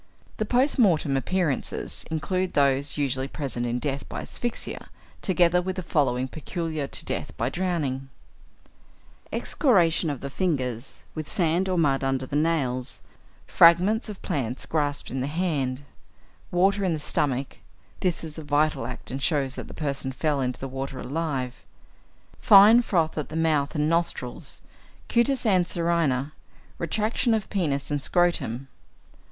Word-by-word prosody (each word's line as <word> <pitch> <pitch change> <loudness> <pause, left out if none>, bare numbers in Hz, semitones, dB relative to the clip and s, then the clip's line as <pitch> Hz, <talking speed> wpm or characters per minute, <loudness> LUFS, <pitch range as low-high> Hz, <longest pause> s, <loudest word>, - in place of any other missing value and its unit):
The 215 - -1
post 255 +5 +2
mortem 165 - +3
appearances 160 0 -1
include 185 +4 -1
those 140 0 +2
usually 135 -2 0
present 130 -4 -3
in 120 +1 -1
death 140 +1 -3
by - - -5
asphyxia, 240 -1 -5 0.3
together 180 -2 +3
with 185 +1 -3
the 185 - -4
following, 130 -6 +1
peculiar 155 0 -4
to - - -3
death - - -4
by 120 +3 -1
drowning: 150 -8 -2 1.2
Excoriations 175 - +2
of 140 - -6
the 140 - -5
fingers, 130 - -2
with 155 -1 -5
sand 175 +1 +1
or 185 - 0
mud 140 -5 +2
under 135 -1 0
the 140 - -5
nails; 145 -6 0 0.4
fragments 185 +7 +5
of 205 - -9
plants 130 -7 -3
grasped 145 -2 -2
in 130 - -2
the 130 - -1
hand; 145 -5 -1 0.7
water 195 +3 +2
in 180 -3 +1
the 155 - -2
stomach 140 -5 -1 0.4
(this 180 -3 -1
is 160 -1 -7
a - - -7
vital 145 -1 +1
act, - - -8
and 135 +2 -4
shows 140 -4 +1
that - - -7
the - - -10
person 140 -3 -3
fell 145 +1 0
into 125 -1 -2
the 135 - -4
water 135 0 -5
alive); 135 -2 -2 0.9
fine 210 +4 +8
froth 165 -9 0
at 150 - -4
the 155 - -7
mouth 155 -2 +1
and 150 0 +1
nostrils; 170 +1 -2 0.5
cutis 250 +2 +2
anserina; 170 - +1 0.5
retraction 220 +7 +1
of 215 -3 -2
penis 145 -8 -1
and 145 -1 0
scrotum. 135 -8 0
155 Hz, 145 wpm, -26 LUFS, 135-180 Hz, 1.2 s, fine